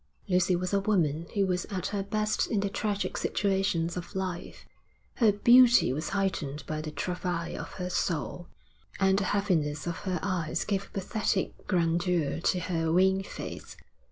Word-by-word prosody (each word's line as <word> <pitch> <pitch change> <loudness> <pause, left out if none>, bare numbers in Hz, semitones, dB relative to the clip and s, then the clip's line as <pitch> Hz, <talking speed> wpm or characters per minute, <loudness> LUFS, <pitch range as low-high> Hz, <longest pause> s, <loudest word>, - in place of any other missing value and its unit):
Lucy 180 -1 +3
was 180 +2 -2
a 200 - +4
woman 170 -6 +1
who 200 -1 +3
was 180 -1 -1
at 190 -3 -4
her 200 -2 -2
best 215 +2 0
in 210 -3 +1
the 200 -1 -1
tragic 205 -1 -2
situations 190 -4 0
of 175 0 -7
life; 185 -2 -4 0.5
her 225 -4 +5
beauty 240 - +6
was 155 +4 -3
heightened 165 -7 -2
by 155 0 -3
the 155 - -5
travail 180 +1 -3
of - - -9
her 180 -1 -4
soul, 175 0 -2 0.5
and 190 0 +4
the 200 - -1
heaviness 165 -8 0
of 170 -1 -3
her 185 -2 -2
eyes 170 -4 -1
gave 200 -2 -1
a - - -24
pathetic 200 0 -2
grandeur 170 -3 +1
to 180 +2 +1
her 165 -2 -1
wan 190 +2 +4
face. 195 - -8
185 Hz, 165 wpm, -29 LUFS, 170-200 Hz, 0.5 s, beauty